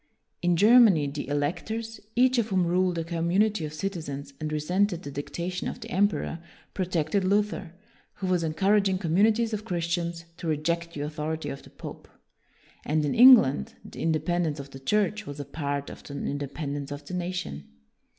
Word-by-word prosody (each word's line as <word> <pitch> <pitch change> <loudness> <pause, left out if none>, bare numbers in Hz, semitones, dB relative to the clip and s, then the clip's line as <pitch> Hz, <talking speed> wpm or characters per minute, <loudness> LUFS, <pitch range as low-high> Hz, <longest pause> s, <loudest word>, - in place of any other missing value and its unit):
In 175 -1 +2
Germany 210 -6 +6
the 145 0 -4
electors, 220 +11 -2 0.2
each 255 +1 +4
of 225 - +1
whom 185 -3 +2
ruled 180 0 +1
a 165 - -1
community 170 +3 +1
of 150 - -10
citizens 150 -7 -5
and 155 0 -3
resented 180 +4 0
the 145 - -6
dictation 170 +6 -4
of - - -5
the 230 -1 -9
emperor, 200 -3 +1 0.3
pro 185 - -1
tected 175 +2 0
Luther, 195 -2 0 0.4
who 195 - -5
was 180 -2 +2
encouraging 190 +5 +2
com 170 -4 -2
munities 225 +3 +3
of 215 0 -2
Christians 170 -3 -2
to 170 - -6
reject 170 +2 -1
the 145 - -3
author 155 +1 -3
ity 160 -2 -4
of 140 - -6
the - - -15
pope. - - -10 0.8
And 150 0 +1
in 145 - 0
England 230 - +7
the - - -9
in 165 - +2
dependence 160 -1 0
of 140 0 -8
the 135 - -9
Church 210 +7 0
was 145 0 -7
a 145 - -4
part 145 -1 -3
of - - -11
the 140 - -9
independence 140 0 -4
of 145 0 -7
the 180 - -8
nation. 180 - -4
170 Hz, 180 wpm, -27 LUFS, 150-195 Hz, 0.8 s, England